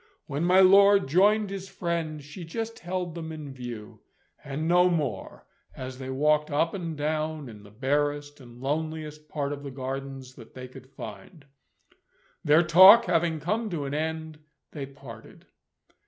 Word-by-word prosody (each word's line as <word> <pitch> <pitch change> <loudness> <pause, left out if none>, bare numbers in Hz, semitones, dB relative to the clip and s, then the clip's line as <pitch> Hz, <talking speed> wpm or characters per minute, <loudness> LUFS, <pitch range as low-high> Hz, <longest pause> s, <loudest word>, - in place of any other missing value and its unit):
When 145 +2 -3
my 180 +2 +5
lord 200 0 +6
joined 200 +6 +3
his 195 -1 -6
friend, 165 -4 -3
she 150 +5 -10
just 225 +7 -5
held 180 -1 -4
them 160 -1 -6
in 150 -3 -8
view, 120 -4 -8 0.4
and 145 +3 -4
no 180 +1 +5
more, 145 - -3 0.3
as 130 0 -7
they 130 -1 -6
walked 150 +3 +1
up 155 +3 0
and 170 -5 -5
down 155 0 -2
in 110 -3 -11
the 105 - -15
barest 145 +5 -2
and 120 -2 -14
loneliest 155 +2 -4
part 145 -1 -3
of 145 - -7
the 140 - -7
Gardens 135 0 -6
that 115 -4 -15
they 130 0 -8
could 130 0 -14
find. 135 - -11 1.0
Their 150 +3 +5
talk 190 +8 +8
having 170 -2 +1
come 215 +9 -2
to 160 -6 -3
an 135 - -4
end, 160 0 -4 0.3
they 140 -3 -6
parted. 135 -5 -13
150 Hz, 160 wpm, -27 LUFS, 135-170 Hz, 1.0 s, talk